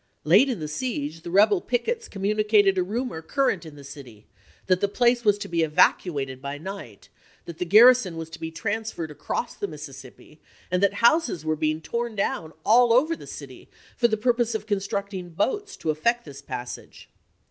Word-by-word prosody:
Late 195 - +5
in 245 - -2
the 155 - -4
siege 155 - -4
the 170 - -8
rebel 200 +1 +4
pickets 450 - -2
com 195 -1 -8
municated 210 -1 +3
a 185 - +1
rumor 210 -2 -3
current 200 - -1
in 150 - -12
the 145 - -12
city, 130 -7 -12 0.4
that 185 -1 +2
the 200 - +3
place 240 +3 +2
was 205 -2 +3
to 205 - -6
be 170 -1 0
evacuated 145 -3 +1
by 140 +1 -5
night; 160 - -9 0.4
that 170 -2 -9
the 180 - -1
gar 210 +6 +7
rison 245 -8 +5
was 165 -1 -6
to 160 - -9
be 160 0 -4
transferred 200 -1 -4
across 235 +9 -4
the 205 - -4
Mississippi, 145 -1 -12 0.3
and 180 0 +1
that 200 0 +3
houses 235 - +3
were 155 0 +1
being 155 0 -1
torn 235 +5 -3
down 170 -5 -2
all 240 +2 +5
over 295 +8 +3
the - - -13
city - - -10 0.3
for 240 - +3
the 220 -2 -1
purpose 235 0 +1
of 220 - -4
constructing 200 -2 -3
boats 410 - -2
to 155 - -1
effect 235 +11 0
this 140 -3 -10
passage. 125 -1 -8
195 Hz, 190 wpm, -25 LUFS, 155-230 Hz, 0.4 s, gar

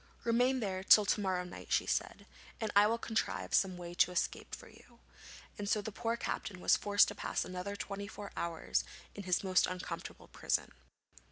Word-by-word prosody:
'Remain 245 +2 +2
there 190 -3 -2
till 210 +1 +7
to 205 - +1
morrow 185 -2 0
night,' 180 - -10
she - - +3
said, - - -2 0.3
'and 220 -2 -2
I 205 +1 +7
will 230 +2 +1
contrive 225 -1 -2
some 185 -2 +3
way 175 -1 -7
of 175 - +3
escape 180 - -2
for - - -14
you,' - - -18 0.6
and 205 -1 -3
so 210 - +3
the 210 +1 -5
poor 230 +2 -2
captain 195 -4 -4
was - - +4
forced 205 0 +4
to - - -5
pass - - -2
another 185 +2 -5
twenty 200 0 -5
four 205 -1 -8
hours 170 -1 -1 0.3
in 200 - -8
his 180 +1 +1
most 185 -1 +3
uncomfortable 185 0 -6
prison. - - -1
200 Hz, 190 wpm, -34 LUFS, 185-215 Hz, 0.6 s, till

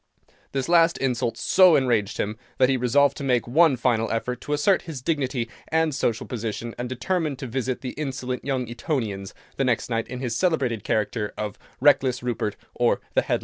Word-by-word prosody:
This 135 -2 -2
last 170 -1 +4
insult 120 -3 -1
so 185 +5 +5
enraged 115 -6 +1
him, 105 +1 -2 0.2
that 130 0 +4
he 135 - +3
resolved 135 +3 +3
to 145 - -5
make 125 -3 +1
one 150 +2 +4
final 115 -2 +1
effort 125 +2 -2
to 145 - -3
assert 175 +6 +3
his 150 -5 -5
dignity 130 -4 -1 0.2
and 160 -1 +1
social 115 -4 -1
position, 115 0 -4
and 125 0 -3
determined 145 +3 -1
to 130 - -6
visit 130 +1 -2
the 125 - -4
insolent 130 -3 -4
young 130 -3 -1
Etonians 115 -6 -3 0.2
the 135 - +1
next 125 -1 0
night 115 0 -1
in 125 - -6
his 125 -3 -2
celebrated 135 - 0
character 105 0 -1
of 105 -2 -4 0.2
"Reckless 125 -2 +3
Rupert, 115 -4 -2 0.2
or - - +2
the - - +4
Headless - - -13
Earl." - - +2
125 Hz, 190 wpm, -24 LUFS, 115-140 Hz, 0.2 s, so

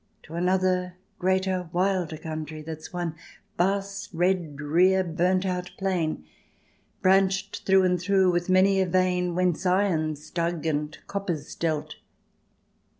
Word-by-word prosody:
To 160 - -13
another, 180 +1 +1 0.2
greater, 185 -1 0
wilder 180 -3 0
country 155 -1 -6
That's 155 0 -8
one 175 -2 -3 0.4
vast 195 +2 -1
red, 175 -3 0
drear, 175 +6 +3
burnt 180 +2 +1
out 180 -1 -2
plain. 175 - -1 0.8
Branched 195 +1 +2
through 190 0 +5
and 180 -2 +1
through 190 0 +3
with 175 +1 -1
many 190 +1 +4
a 190 - +1
vein 180 -1 +1
Whence 180 -1 +1
iron's 165 -6 0
dug 170 -2 -2
and 150 -1 -1
copper's 180 -7 -4
dealt. 155 -3 -2
180 Hz, 125 wpm, -26 LUFS, 165-190 Hz, 0.8 s, through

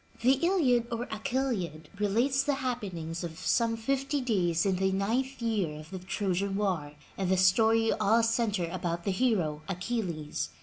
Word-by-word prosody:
The 260 +3 +4
Iliad 270 -11 +3
or 235 0 -2
Achilliad 220 - -2
relates 235 +7 +2
the 285 0 0
happen 245 -9 -3
ings 165 +1 -5
of 165 -2 -6
some 230 -1 +1
fifty 275 +5 -1
days 185 -10 +1
in 190 -2 +2
the 190 +1 +1
ninth 235 +7 -1
year 195 -10 -1
of 155 +1 -12
the 190 - -5
Trojan 195 +1 -1
War, 180 -8 -1 0.3
and 190 -2 0
the 190 - +3
story 225 +5 +4
all 225 +3 +3
center 225 -6 +1
about 170 -2 -3
the 195 - 0
hero, 185 -9 +1
Achilles. 180 -5 -3
205 Hz, 165 wpm, -29 LUFS, 180-235 Hz, 0.3 s, The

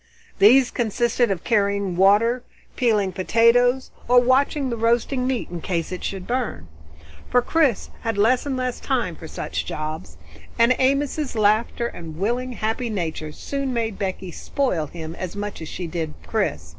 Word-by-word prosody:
These 245 +5 +6
consisted 240 +1 +1
of 190 -4 -2
carrying 200 -4 +1
water, 210 +7 +4 0.3
peeling 210 -6 +2
potatoes, 230 +7 +3 0.2
or 245 +1 +7
watching 260 +2 +2
the - - -1
roasting 235 +3 +1
meat 255 -8 -2
in 175 -1 -5
case 170 -1 -2
it 180 - -5
should 190 -2 -4
burn. 240 - -3 0.6
For 250 - +4
Chris 300 -8 +1
had 225 -2 -2
less 245 +7 +3
and 265 -2 -1
less 255 -1 -2
time 240 - -1
for 160 - -10
such 80 - -4
jobs, 155 - -5 0.4
and 235 +2 +5
Amos's 275 +1 +1
laughter 215 +2 +2
and 165 -8 -7
willing 245 +6 -1
happy 225 +2 -2
nature 160 -6 -3
soon 275 - -3
made 225 -3 -2
Becky 190 -2 -3
spoil 180 - -1
him 160 0 -7
as 185 0 -5
much 205 -3 -5
as 160 - -6
she 180 - -5
did 160 -2 -4
Chris. 80 0 -2
220 Hz, 160 wpm, -23 LUFS, 180-250 Hz, 0.6 s, or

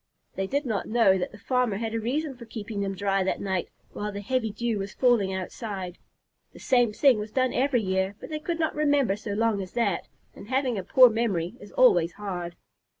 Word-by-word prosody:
They 195 0 -2
did 285 +6 -1
not 220 -5 -2
know 215 -5 +4
that 180 - -3
the - - -12
farmer 245 -1 0
had 225 0 -3
a 225 - 0
reason 270 +5 -2
for 240 -1 -11
keeping 215 -2 -5
them 195 -1 -2
dry 195 0 +1
that 185 - -1
night 190 -3 -2 0.2
while 210 0 -4
the 200 0 -6
heavy 240 +1 -1
dew 225 0 -2
was 195 +1 -5
falling 240 -7 +3
outside. 190 -1 -5 0.5
The - - -13
same 245 -3 +3
thing 250 +1 +4
was 210 +1 -5
done 255 +2 +1
every 255 -3 +2
year, 190 +1 0
but - - -10
they 305 - -2
could 330 +2 -3
not 320 -1 0
remember 285 -8 +2
so 205 0 -5
long 220 -1 +1
as 185 -1 -8
that, 230 -6 0 0.3
and - - -12
having 260 0 0
a - - -5
poor 255 +6 +7
memory 205 -6 -1
is 205 - -12
always 175 -9 +4
hard. 180 -4 -5
215 Hz, 215 wpm, -26 LUFS, 195-250 Hz, 0.5 s, poor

